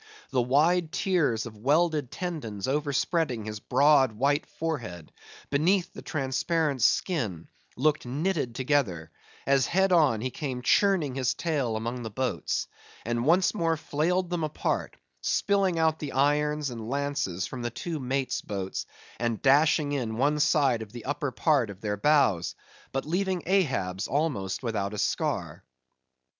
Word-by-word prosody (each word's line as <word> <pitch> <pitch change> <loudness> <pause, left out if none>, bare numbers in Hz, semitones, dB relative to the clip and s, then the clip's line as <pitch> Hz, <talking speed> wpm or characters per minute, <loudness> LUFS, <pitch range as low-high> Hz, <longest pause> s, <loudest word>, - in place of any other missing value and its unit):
The 130 - +2
wide 155 +7 +2
tiers 155 - +1
of 115 -2 -9
welded 150 +3 +2
tendons 130 - -4
overspreading 145 -3 0
his 110 0 -5
broad 135 0 +4
white 140 +6 +1
forehead, 115 - -5 0.4
beneath 170 +6 +2
the - - -9
transparent 140 0 -1
skin, 115 - +1 0.3
looked 150 0 +1
knitted 145 -2 -1
together; 125 - 0 0.3
as 135 -2 +3
head 190 +1 +2
on, 150 -11 +4
he 130 +2 -2
came 130 -4 -4
churning 185 -5 +3
his 130 -1 0
tail 140 -9 -1
among 120 +3 -3
the 115 - -5
boats; 125 +2 -2 0.4
and 120 +2 -1
once 180 +3 +4
more 165 -5 0
flailed 175 +5 -1
them 175 -2 -1
apart; 155 -1 -2 0.2
spilling 195 - +1
out 160 -1 +2
the 145 -3 -5
irons 150 +1 +1
and 115 -2 -6
lances 140 -10 -1
from 130 - -6
the 120 - -2
two 160 +7 -5
mates' 130 0 -1
boats, 95 -2 -4 0.3
and 115 -2 -1
dashing 145 +1 +4
in 120 -6 -2
one 145 +4 +2
side 145 -6 +3
of 110 -2 -8
the 120 -2 -8
upper 145 +1 -2
part 135 -3 +2
of 100 -2 -9
their 105 -1 -2
bows, 105 - +2 0.4
but 135 - -2
leaving 185 +2 -1
Ahab's 130 - 0
almost 130 -10 -1
without 105 -3 -2
a - - -6
scar. - - -2
140 Hz, 150 wpm, -27 LUFS, 115-160 Hz, 0.4 s, broad